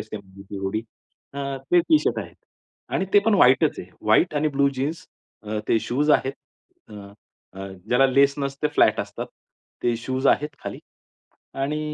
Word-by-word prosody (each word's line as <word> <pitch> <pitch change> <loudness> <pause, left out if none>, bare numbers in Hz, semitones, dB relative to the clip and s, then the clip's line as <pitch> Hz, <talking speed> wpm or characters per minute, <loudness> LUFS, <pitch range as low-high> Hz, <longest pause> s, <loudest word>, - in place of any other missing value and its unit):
असते 110 - -9 0.4
ते - - -5
हुडी, 95 +3 -2 0.5
अ, - - -5 0.3
ते 175 0 +6
टी-शर्ट 305 - +2
आहे - - -7 0.6
आणि 190 - 0
ते - - +9
पण 225 - +4
व्हाईटच 140 -3 +4
आहे. 90 - -8
व्हाईट 110 +11 +3
आणि 150 +1 +1
ब्लू 140 0 +4
जीन्स 155 +7 -3 0.4
अ, 105 0 -3
ते 115 - +4
शूज 145 +5 0
आहेत, 135 -2 +3 0.6
अ, 105 - -12 0.7
अ, 100 - -6 0.2
ज्याला 125 +3 +5
लेस 140 +1 +4
नसते, 140 +1 -2
फ्लॅट - - +4
असतात. - - -6 0.6
ते 120 -1 +1
शूज 130 +3 -2
आहेत 150 0 +2
खाली. - - -5 0.8
आणि 150 +3 -1
140 Hz, 160 wpm, -24 LUFS, 120-150 Hz, 0.8 s, ते